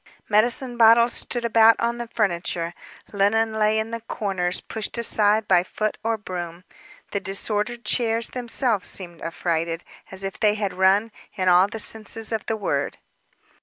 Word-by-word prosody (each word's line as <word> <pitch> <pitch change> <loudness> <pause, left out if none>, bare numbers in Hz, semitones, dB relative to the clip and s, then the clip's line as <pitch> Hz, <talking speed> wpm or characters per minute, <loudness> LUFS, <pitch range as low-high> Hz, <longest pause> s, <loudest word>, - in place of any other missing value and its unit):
Medicine 240 +4 +2
bottles 235 +1 +6
stood 240 -1 -2
about 225 0 +5
on 235 +1 -1
the 240 - -5
furniture, 175 -6 -2 0.4
linen 220 +3 +1
lay 215 0 +1
in 220 +1 -2
the 230 0 -5
corners, 190 -5 -2
pushed 220 +1 -5
aside 215 -2 +2
by 180 -2 +5
foot 215 +4 -3
or 225 0 0
broom. 175 -4 -7 0.5
The 200 - -1
disordered 210 +4 0
chairs 230 -2 0
themselves 240 -4 0
seemed 175 -3 -4
affrighted, 165 0 -2 0.3
as 190 0 -4
if 195 0 -5
they 210 -1 +3
had 205 -2 -3
run, 195 +4 +2 0.2
in 185 -2 +1
all 180 +2 +5
the 215 - -7
senses 220 0 -1
of 220 -3 -3
the 225 - -1
word. 145 -9 -2
215 Hz, 160 wpm, -23 LUFS, 190-225 Hz, 0.5 s, bottles